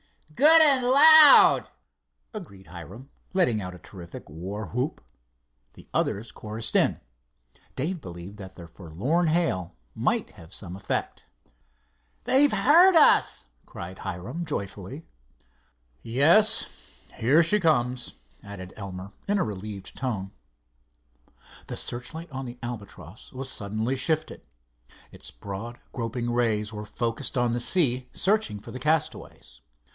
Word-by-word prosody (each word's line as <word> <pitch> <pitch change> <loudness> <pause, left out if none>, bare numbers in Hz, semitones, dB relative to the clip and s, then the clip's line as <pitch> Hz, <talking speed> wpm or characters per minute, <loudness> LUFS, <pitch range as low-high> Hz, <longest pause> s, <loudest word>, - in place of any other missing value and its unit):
"Good 315 - +7
and 270 -5 +4
loud!" 300 +3 +8 0.6
agreed 125 - -10
Hiram, 95 - -11 0.2
letting 125 - +2
out 90 -1 -7
a - - -11
terrific 90 -2 -12
warwhoop. 100 - -5 0.7
The - - -16
others 110 +3 -1
chorused 110 +1 -5
in. - - +2 0.8
Dave 165 +5 -3
believed 90 +1 -10
that 95 -2 -11
their 85 -2 -11
forlorn 100 - -2
hail 155 - -1 0.2
might - - -1
have 80 -1 -16
some 90 -3 -7
effect. 95 - -4 1.0
"They've 285 +2 +4
heard 345 +6 +5
us," 310 - +4 0.2
cried 90 +2 -9
Hiram, 95 - -6
joyfully. 105 - -6 1.0
"Yes, 170 - +2
here 140 +9 +3
she 210 +6 +3
comes," 125 -8 0 0.3
added 95 -2 -10
Elmer, 95 -1 -8 0.2
in 205 +1 +1
a - - +1
relieved 105 -1 -7
tone. 105 -8 -4 1.4
The - - -6
searchlight 155 +7 -4
on 135 0 -6
the 120 0 -9
Albatross 100 -6 -9
was 130 0 -5
suddenly 110 +5 -2
shifted. 155 +4 -3 0.6
Its - - -9
broad, 100 +5 -8
groping 120 0 -4
rays 110 -3 0
were 105 0 -6
focussed 120 +5 -3
on 120 -1 +1
the 120 - -1
sea, 130 -3 +1
searching 200 - 0
for - - -12
the 130 - -7
castaways. 150 - -3
120 Hz, 120 wpm, -26 LUFS, 100-160 Hz, 1.4 s, loud